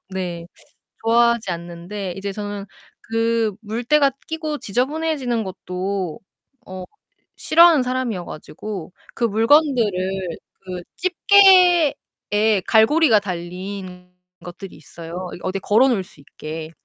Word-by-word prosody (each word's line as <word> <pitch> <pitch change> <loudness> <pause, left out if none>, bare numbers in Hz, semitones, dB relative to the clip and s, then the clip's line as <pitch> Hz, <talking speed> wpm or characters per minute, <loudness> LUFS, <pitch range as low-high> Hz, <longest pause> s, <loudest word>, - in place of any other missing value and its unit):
네 175 -3 -5 0.6
좋아하지 235 -2 +3
않는데 175 +3 -6
이제 195 0 -4
저는 205 -1 -6 0.4
그 225 -2 0
물때가 245 +7 +1 0.2
끼고 315 -2 -4
지저분해지는 260 0 -1
것도 185 -2 -4 0.5
어 185 -1 -7 0.5
싫어하는 330 -3 +5
사람 255 -1 -1
이어 180 -4 -5
가지고 185 +4 -8 0.2
그 - - -4
물건들을 215 - +2 0.2
그 180 -1 -7
집게에 355 - +4
갈고리가 230 +2 +5
달린 180 0 -7 0.3
것들이 175 +2 -9
있어요, 165 +4 -8
이 - - -11
어디 185 +1 -2
걸어 225 +7 +3
놓을 225 -7 +1
수 175 - -19
있게. 155 +3 -8
205 Hz, 245 characters per minute, -21 LUFS, 185-250 Hz, 0.6 s, 싫어하는